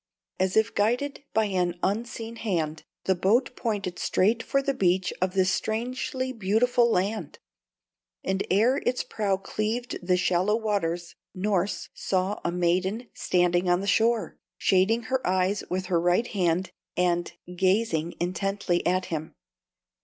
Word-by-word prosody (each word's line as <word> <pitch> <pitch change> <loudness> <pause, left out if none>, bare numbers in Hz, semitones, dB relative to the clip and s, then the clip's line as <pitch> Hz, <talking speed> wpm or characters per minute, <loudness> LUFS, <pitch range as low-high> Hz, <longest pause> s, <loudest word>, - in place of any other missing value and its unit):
As 190 +2 +1
if 220 +1 +3
guided 245 +8 0
by 220 0 +2
an 180 -3 0
unseen 230 +2 -2
hand, 160 -9 -2 0.2
the 190 - +3
boat 220 +8 +2
pointed 200 -6 -3
straight 220 +5 +2
for 275 - +1
the 275 0 0
beach 185 -4 +1
of 185 +1 0
this 185 -1 +3
strangely 255 +5 -2
beautiful 235 +3 +2
land; 205 +2 -1 0.9
and 190 +1 0
ere 225 +8 +4
its 250 -3 -1
prow 200 -3 -1
cleaved 215 +5 -3
the 180 0 +2
shallower 185 +4 +2
waters, 175 -6 -1 0.2
Norss 195 0 -1
saw 190 +2 -1
a 170 - 0
maiden 185 +6 0
standing 175 0 +1
on 175 0 +4
the - - -4
shore, 225 +3 +1 0.2
shading 200 +5 +3
her 260 +3 -1
eyes 185 +2 +1
with 185 +1 -2
her 175 -2 +1
right 175 +6 +3
hand, 185 -4 0 0.3
and 175 -1 +1 0.2
gazing 185 -3 +1
intently 180 0 -1
at 185 +1 +1
him. 155 0 -4
195 Hz, 140 wpm, -26 LUFS, 180-225 Hz, 0.9 s, ere